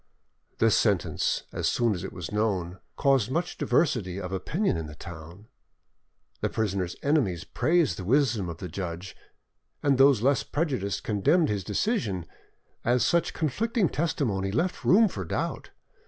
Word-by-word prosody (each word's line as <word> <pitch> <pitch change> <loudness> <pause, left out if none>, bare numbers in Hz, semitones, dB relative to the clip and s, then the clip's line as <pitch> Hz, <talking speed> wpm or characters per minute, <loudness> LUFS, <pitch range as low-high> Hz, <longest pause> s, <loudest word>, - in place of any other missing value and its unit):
This - - +4
sentence, - - +1
as - - -1
soon 120 -2 +2
as 90 -2 -5
it 95 - -5
was 90 -4 -7
known, 95 -4 -1 0.2
caused 135 -5 +2
much 170 +6 -2
diversity 100 - +1
of 90 -2 -5
opinion 160 - 0
in 80 -1 -4
the 75 - -10
town. 85 +6 -10 0.9
The - - -1
prisoner's 95 -5 -2
enemies 120 - +1
praised 160 - +1
the - - -4
wisdom 115 -4 +2
of 85 - -6
the 90 - -6
judge, 90 +1 -6 0.7
and 140 -2 +3
those 135 -5 +5
less 140 +2 +3
prejudiced 130 - -2
condemned 110 - +2
his 100 -2 -1
decision; 105 - -1 0.6
as 125 +1 +2
such 170 -1 +1
conflicting 200 - 0
testimony 120 - -1
left 170 - -1
room 215 +5 +6
for 100 - -5
doubt. 80 - -3
110 Hz, 150 wpm, -27 LUFS, 95-150 Hz, 0.9 s, room